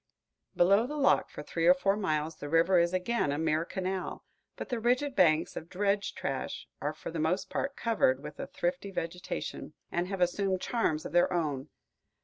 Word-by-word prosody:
Below 200 +6 +4
the 300 +2 -5
lock 280 - +3
for 150 - -8
three 165 +2 -1
or 180 - +8
four 195 +2 +2
miles, 160 -6 -1
the 145 - -6
river 165 +3 +4
is 170 0 +2
again 185 -2 0
a 145 - -1
mere 160 0 +1
canal, 185 +1 -4 0.3
but - - -7
the 245 -3 -1
rigid 255 +4 +1
banks 160 -3 +3
of 165 - -7
dredge 200 +1 0
trash 130 -3 -4
are 150 +1 -2
for - - -7
the 165 - -4
most 180 +5 0
part 275 +1 -2
covered 145 - +1
with 150 0 -8
a - - -4
thrifty 180 +3 -2
vegetation, 175 -3 -5 0.2
and 175 +1 -1
have 195 0 -4
assumed 185 +1 +1
charms 180 -9 0
of - - -5
their 175 +1 +4
own. 150 -5 -1
180 Hz, 190 wpm, -30 LUFS, 155-200 Hz, 0.3 s, or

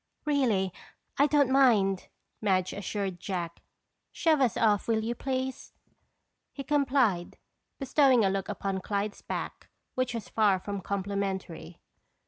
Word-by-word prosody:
"Really, 230 - +1 0.5
I 285 - +6
don't 285 -3 +3
mind," 215 -8 +3 0.3
Madge 185 -3 +1
assured 200 -2 -3
Jack. 175 -3 -4 0.5
"Shove 315 -4 +2
us 250 -4 +2
off, 210 -3 +2
will 220 -1 +1
you, 230 +2 -1
please?" 260 +1 -4 0.8
He 275 - -7
complied, 265 -10 +1 0.4
bestowing 265 -4 +4
a - - +3
look 195 0 -3
upon 195 -1 -3
Clyde's 205 +1 -3
back - - -6 0.2
which 255 -1 -1
was 225 -3 -5
far 210 -4 +3
from 200 +1 -5
complimentary. 190 -3 -4
210 Hz, 125 wpm, -29 LUFS, 195-260 Hz, 0.8 s, I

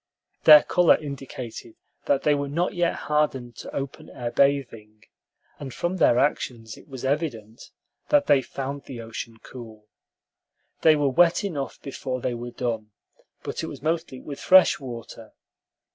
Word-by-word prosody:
Their 150 -1 +10
color 175 -2 +4
indicated 130 -5 -8 0.3
that 140 -1 +1
they 150 - +4
were 140 -1 -2
not 170 +5 -1
yet 175 -2 0
hardened 135 -6 0
to - - -9
open 135 -1 -6
air 120 -1 -5
bathing, 120 -6 0 0.6
and 140 -2 -7
from 175 +8 -3
their 120 - +4
actions 120 -5 -1
it - - -17
was 135 -3 -7
evident 130 -7 -3 0.4
that 290 -1 +4
they 140 -2 +4
found 135 +2 -6
the 125 -3 -8
ocean 115 0 -7
cool. 110 -4 -11 1.0
They 160 -1 +6
were 145 -2 +1
wet 170 +8 +3
enough 150 -9 -4
before 130 -2 -4
they 125 - -2
were 120 +1 -6
done, 115 -3 -4 0.5
but - - -4
it - - -4
was - - -9
mostly 160 -4 -2
with 140 0 -8
fresh 185 0 +6
water. 115 -4 -9
135 Hz, 155 wpm, -25 LUFS, 120-150 Hz, 1.0 s, Their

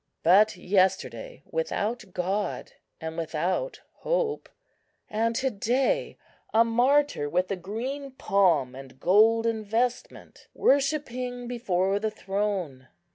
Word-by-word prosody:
But 200 +6 +5
yesterday 195 - 0
without 240 - -2
God 190 +3 -2 0.3
and 160 -1 -5
without 170 - -2 0.2
hope; - - -1 0.6
and 230 +2 0
to 260 +2 0
day 260 - 0 0.3
a 225 +1 +5
martyr 250 - +2
with 180 +4 0
a - - +1
green 240 +10 -5
palm 185 - +2
and 130 0 -12
golden 225 +5 +3
vestment, 235 +4 -3
worshipping 255 -3 0
before 195 -5 0
the 220 +1 -1
Throne. 195 -10 -3
220 Hz, 105 wpm, -27 LUFS, 185-255 Hz, 0.6 s, But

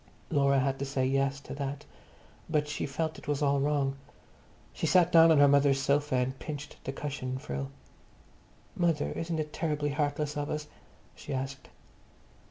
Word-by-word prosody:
Laura 140 -2 +3
had 135 0 0
to - - -2
say 135 -1 0
"yes" 135 +1 +1
to - - -9
that, 140 +1 -4 0.6
but 150 -1 +1
she 150 - -3
felt 155 +3 -3
it - - -15
was 145 0 0
all 140 -1 +3
wrong. 140 -1 +1 0.8
She - - -2
sat 180 -1 +4
down 165 -1 +8
on 160 - +5
her 145 0 +7
mother's 140 -1 +4
sofa 140 0 +1
and 130 +1 0
pinched 150 -1 -7
the 135 - -2
cushion 135 -2 -4
frill. 70 - -4 1.1
"Mother, 165 -4 +1
isn't 165 0 -3
it 150 -1 -4
terribly 150 -3 -1
heartless 145 0 -1
of 145 0 -2
us?" 150 0 -3 0.5
she 140 - -6
asked. 135 +1 -5
145 Hz, 170 wpm, -30 LUFS, 135-150 Hz, 1.1 s, down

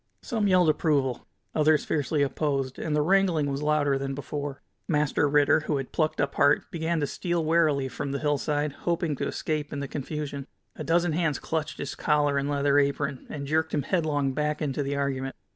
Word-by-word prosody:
Some 220 -3 0
yelled 180 -3 +4
approval, 145 -5 +1 0.3
others 155 -1 +3
fiercely 145 0 0
opposed, 135 -1 -1
and 155 -2 -1
the 150 - +2
wrangling 175 -5 +2
was 140 +1 -3
louder 150 -2 +2
than 135 0 -3
before. 145 0 -5 0.2
Master 150 -2 +2
Ritter, 145 +1 +4
who 155 -1 -1
had 135 -2 -5
plucked 155 -1 0
up 145 - 0
heart, 145 - +4
began 165 0 -1
to - - +2
steal 170 +3 -2
warily 155 -4 +2
from 140 +1 -4
the 140 - -1
hillside, 145 0 0 0.2
hoping 170 -3 0
to 140 - -2
escape 150 -2 -3
in 145 - -4
the 140 - -3
confusion. 145 0 -5 0.3
A - - -6
dozen 170 +1 +2
hands 160 -2 0
clutched 160 -2 -3
his 140 - -4
collar 145 -2 +2
and 140 +1 -2
leather 145 0 +3
apron, 140 -1 -1
and 140 -2 -5
jerked 160 +2 0
him 145 - 0
headlong 145 -5 0
back 150 +1 -1
into 145 -2 -1
the 140 0 -2
argument. 135 -1 -2
145 Hz, 195 wpm, -27 LUFS, 140-155 Hz, 0.3 s, yelled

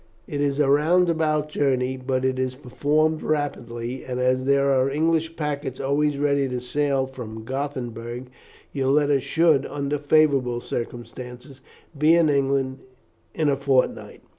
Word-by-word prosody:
It 145 - -4
is 140 0 0
a 145 - +3
round 165 +5 +4
about 155 -2 0
journey, 130 -3 0
but 130 0 -2
it 130 0 0
is 130 0 -1
performed 150 +4 0
rapidly; 125 -5 -3
and 125 -1 -4
as 130 0 +1
there 140 0 +3
are 130 0 +3
English 160 +2 0
packets 145 -4 -3
always 145 +1 +1
ready 140 -1 +1
to 125 -1 -2
sail 135 +1 0
from 115 -4 -8
Gothenburg, 125 -2 -5 0.4
your 135 -2 -1
letters 145 0 +3
should, 160 0 +3
under 140 0 -2
favourable 140 -5 +2
circumstances, 125 +3 -7 0.3
be 155 +3 +4
in 165 -2 +4
England 135 -1 0 0.6
in 155 -2 +1
a 140 - +3
fortnight. 135 -2 0
140 Hz, 145 wpm, -24 LUFS, 130-150 Hz, 0.6 s, round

